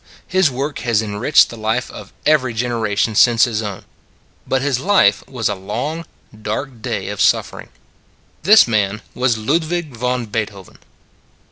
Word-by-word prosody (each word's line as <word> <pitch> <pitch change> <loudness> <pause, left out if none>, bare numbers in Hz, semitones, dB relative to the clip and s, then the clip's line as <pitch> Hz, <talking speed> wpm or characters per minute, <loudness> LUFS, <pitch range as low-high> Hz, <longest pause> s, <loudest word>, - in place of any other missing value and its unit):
His 185 -3 +2
work 140 +3 -4
has 115 -3 0
enriched 110 +9 +3
the 115 - -9
life 110 +3 -2
of - - -11
every 130 -6 +2
generation 110 -3 -1
since 115 +1 +5
his 115 -3 +1
own: 100 -3 -6 0.6
but 130 0 0
his 140 -3 0
life 175 - +3
was 125 -5 -2
a 105 - 0
long, 125 - -5 0.3
dark 115 +3 -4
day - - -3
of - - -4
suffering. - - +1 0.7
This 210 - +6
man 105 -1 0
was 125 -2 +1
Ludwig 155 +4 -1
von 125 +1 -2
Beethoven. 105 -3 -5
120 Hz, 145 wpm, -18 LUFS, 110-140 Hz, 0.7 s, This